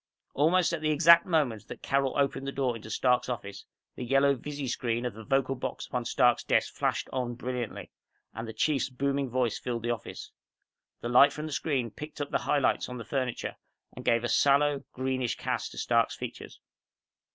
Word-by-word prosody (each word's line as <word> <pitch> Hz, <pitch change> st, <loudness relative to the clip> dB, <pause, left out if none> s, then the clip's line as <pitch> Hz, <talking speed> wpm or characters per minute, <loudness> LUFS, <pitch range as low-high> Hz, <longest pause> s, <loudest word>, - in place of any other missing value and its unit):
Almost 170 Hz, +4 st, +3 dB
at 165 Hz, -, -2 dB
the 155 Hz, -, +1 dB
exact 170 Hz, +3 st, +6 dB
moment 140 Hz, -, 0 dB
that -, -, -9 dB
Carol 135 Hz, 0 st, +1 dB
opened 140 Hz, -1 st, 0 dB
the -, -, -1 dB
door 130 Hz, -3 st, -1 dB
into 110 Hz, -1 st, -9 dB
Stark's 125 Hz, +2 st, +1 dB
office, 100 Hz, -5 st, -6 dB, 0.3 s
the -, -, -5 dB
yellow 135 Hz, +3 st, +3 dB
visi 145 Hz, +1 st, -5 dB
screen 120 Hz, 0 st, -1 dB
of 120 Hz, -, -2 dB
the 110 Hz, +2 st, -10 dB
vocal 135 Hz, +3 st, +1 dB
box 130 Hz, -, -5 dB
upon 125 Hz, -1 st, -3 dB
Stark's 120 Hz, 0 st, +3 dB
desk -, -, +1 dB
flashed -, -, -1 dB
on 125 Hz, -2 st, -2 dB
brilliantly 125 Hz, -2 st, -5 dB, 0.4 s
and 115 Hz, +1 st, -6 dB
the -, -, -5 dB
Chief's 135 Hz, +5 st, 0 dB
booming 140 Hz, +1 st, -1 dB
voice 120 Hz, -3 st, 0 dB
filled 120 Hz, -2 st, -4 dB
the 120 Hz, -, 0 dB
office. 115 Hz, -, -6 dB, 0.7 s
The 120 Hz, -, -3 dB
light 140 Hz, +4 st, +7 dB
from 150 Hz, +1 st, -6 dB
the 155 Hz, -, -6 dB
screen 135 Hz, -7 st, -1 dB
picked 150 Hz, +9 st, -9 dB
up 145 Hz, -1 st, -4 dB
the -, -, +1 dB
highlights 145 Hz, -3 st, +2 dB
on 125 Hz, -, -6 dB
the 115 Hz, -, -7 dB
furniture 130 Hz, -4 st, -3 dB, 0.4 s
and -, -, -8 dB
gave 115 Hz, 0 st, +2 dB
a -, -, 0 dB
sallow, 140 Hz, +1 st, +3 dB
greenish 130 Hz, -2 st, -1 dB
cast -, -, -2 dB
to -, -, -12 dB
Stark's -, -, +1 dB
features. -, -, -8 dB
130 Hz, 195 wpm, -29 LUFS, 120-140 Hz, 0.7 s, light